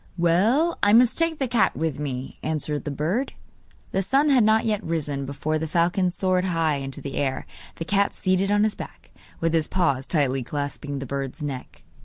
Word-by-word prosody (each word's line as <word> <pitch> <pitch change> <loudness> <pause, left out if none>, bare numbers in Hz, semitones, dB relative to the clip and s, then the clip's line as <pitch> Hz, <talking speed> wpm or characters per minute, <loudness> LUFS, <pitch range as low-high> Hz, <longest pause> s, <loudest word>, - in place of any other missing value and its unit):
'Well, 215 - +2
I 205 +1 +4
must 240 +1 +6
take 330 -1 +1
the 270 - -1
cat 230 -6 +2
with 160 -3 -2
me,' 130 -3 -5
answered 150 -1 -3
the - - -2
bird. 165 - -1 0.6
The 195 - +1
sun 275 +9 +2
had 260 -5 +5
not 220 +2 +3
yet 215 -2 0
risen 145 -4 -2
before 150 +3 -2
the 160 - -3
falcon 180 +3 +2
soared 185 0 0
high 165 -5 +1
into 135 -1 -6
the 140 - -5
air, 135 -2 -1 0.3
the 165 - -5
cat 200 +2 +1
seated 185 +1 +1
on 205 0 +3
his 215 -1 +2
back, - - -10 0.3
with 165 0 +1
his 160 -2 +2
paws 140 -8 0
tightly 135 -5 +1
clasping 145 +2 -4
the 135 - -5
bird's 140 +3 -4
neck. 135 -3 -6
165 Hz, 195 wpm, -24 LUFS, 145-205 Hz, 0.6 s, must